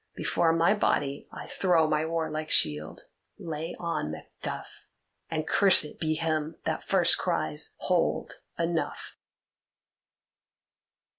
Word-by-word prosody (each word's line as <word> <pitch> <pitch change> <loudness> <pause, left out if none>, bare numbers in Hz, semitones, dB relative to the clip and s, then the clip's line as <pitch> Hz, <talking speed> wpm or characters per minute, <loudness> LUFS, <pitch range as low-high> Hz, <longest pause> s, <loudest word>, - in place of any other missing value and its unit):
Before 165 -1 +1
my 165 +3 +3
body 145 -9 -1
I - - -8
throw 170 -4 +2
my 155 +1 0
warlike 160 -1 -3
shield. 75 +1 +2 0.4
Lay 160 +1 -5
on, 170 - -2
Macduff, 80 - -7 0.4
and 155 -1 -2
cursed 190 -6 +4
be 155 -1 0
him 155 -1 -1
that - - -2
first - - +4
cries, - - -2
'Hold, - - 0 0.2
enough! 170 0 -2
160 Hz, 105 wpm, -28 LUFS, 155-165 Hz, 0.4 s, cursed